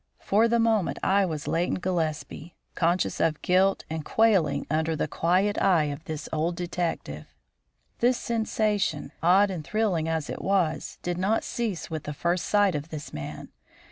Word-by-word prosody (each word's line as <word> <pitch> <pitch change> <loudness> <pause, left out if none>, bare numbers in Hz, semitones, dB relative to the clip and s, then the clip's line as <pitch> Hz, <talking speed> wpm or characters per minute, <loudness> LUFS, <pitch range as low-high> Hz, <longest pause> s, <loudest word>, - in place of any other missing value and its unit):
For 215 +4 +3
the 235 0 +2
moment 225 -4 +1
I 195 0 +3
was 155 -3 -5
Leighton 170 +2 0
Gillespie, 170 -2 -3 0.2
conscious 175 +1 0
of 155 -2 +1
guilt 190 +2 +2
and 160 -1 -4
quailing 210 -4 +2
under 160 +2 0
the - - -1
quiet 185 +5 +1
eye 160 -6 +3
of 150 +3 -11
this 155 -2 -5
old 165 +2 0
detective. 170 - -3 0.7
This 245 +1 +3
sensation, 215 -7 -1
odd 190 +4 +4
and 170 -5 -5
thrilling 185 -5 0
as 160 -2 -1
it - - -5
was, 185 -5 0
did 175 0 -2
not 205 +4 +1
cease 215 -9 -3
with 155 -2 -4
the 150 - -4
first 170 +4 -1
sight 205 -2 +3
of 150 +1 -4
this 155 -2 -7
man. 75 0 -7
175 Hz, 165 wpm, -26 LUFS, 155-200 Hz, 0.7 s, odd